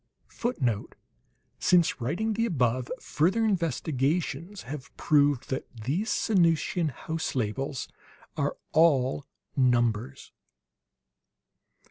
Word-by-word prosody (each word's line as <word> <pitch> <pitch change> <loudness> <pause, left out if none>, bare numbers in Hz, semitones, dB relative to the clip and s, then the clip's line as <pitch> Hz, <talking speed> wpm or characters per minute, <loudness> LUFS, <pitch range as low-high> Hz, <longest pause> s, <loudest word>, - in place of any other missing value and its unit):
[Footnote: 125 - -2 0.6
Since 175 -6 +3
writing 180 - -1
the 230 +2 +1
above, 125 - 0
further 190 +9 +1
investigations 165 - -1
have 135 +1 -7
proved 145 -4 +2
that 130 - -2
these 140 - -2
Sanusian 170 -4 +2
house 160 +4 -4
labels 130 +3 -2 0.5
are - - -1
all 140 -4 +3 0.3
numbers. 120 0 +1
145 Hz, 85 wpm, -28 LUFS, 125-175 Hz, 0.6 s, Since